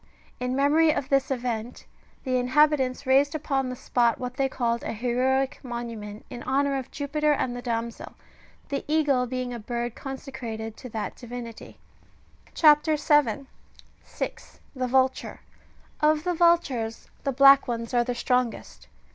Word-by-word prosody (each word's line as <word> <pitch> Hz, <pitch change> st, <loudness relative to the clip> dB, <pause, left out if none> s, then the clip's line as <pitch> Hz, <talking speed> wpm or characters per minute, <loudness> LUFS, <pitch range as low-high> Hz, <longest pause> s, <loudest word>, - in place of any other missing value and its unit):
In 250 Hz, +1 st, -2 dB
memory 295 Hz, +4 st, +4 dB
of 285 Hz, -3 st, -1 dB
this 275 Hz, -1 st, +2 dB
event, 240 Hz, -3 st, -3 dB, 0.4 s
the 255 Hz, -2 st, 0 dB
inhabitants 265 Hz, +1 st, +2 dB
raised 275 Hz, +3 st, +3 dB
upon 275 Hz, -4 st, -1 dB
the 255 Hz, -, -4 dB
spot 235 Hz, -2 st, +1 dB
what 250 Hz, -1 st, -5 dB
they 270 Hz, -1 st, +1 dB
called 235 Hz, -2 st, -1 dB
an -, -, -4 dB
heroic 255 Hz, +3 st, 0 dB
monument,^* 230 Hz, -4 st, -6 dB
in 240 Hz, -, -7 dB
honour 275 Hz, +2 st, +1 dB
of 260 Hz, -, -8 dB
Jupiter 300 Hz, +1 st, 0 dB
and 250 Hz, -3 st, -1 dB
the 245 Hz, -, -5 dB
damsel, 235 Hz, -1 st, -4 dB, 0.5 s
the 280 Hz, -, -2 dB
eagle 290 Hz, -5 st, +2 dB
being 255 Hz, 0 st, -3 dB
a 240 Hz, -, -5 dB
bird 240 Hz, +1 st, -3 dB
consecrated 240 Hz, -5 st, -6 dB
to 255 Hz, -, -9 dB
that 220 Hz, -2 st, -4 dB
divinity. 240 Hz, -2 st, -9 dB, 0.8 s
CHAP. 300 Hz, -2 st, +6 dB
7. 290 Hz, -4 st, +2 dB, 0.6 s
(6.) -, -, -7 dB, 0.2 s
THE 255 Hz, -1 st, -1 dB
VULTURE. 260 Hz, +1 st, +1 dB, 0.6 s
Of 305 Hz, 0 st, +3 dB
the 360 Hz, 0 st, 0 dB
vultures, 305 Hz, -10 st, +1 dB, 0.2 s
the 275 Hz, -, 0 dB
black 275 Hz, +1 st, +7 dB
ones^^ 230 Hz, -1 st, -4 dB
are 240 Hz, -1 st, +3 dB
the 245 Hz, 0 st, -3 dB
strongest. 250 Hz, -1 st, -2 dB
255 Hz, 145 wpm, -26 LUFS, 240-280 Hz, 0.8 s, black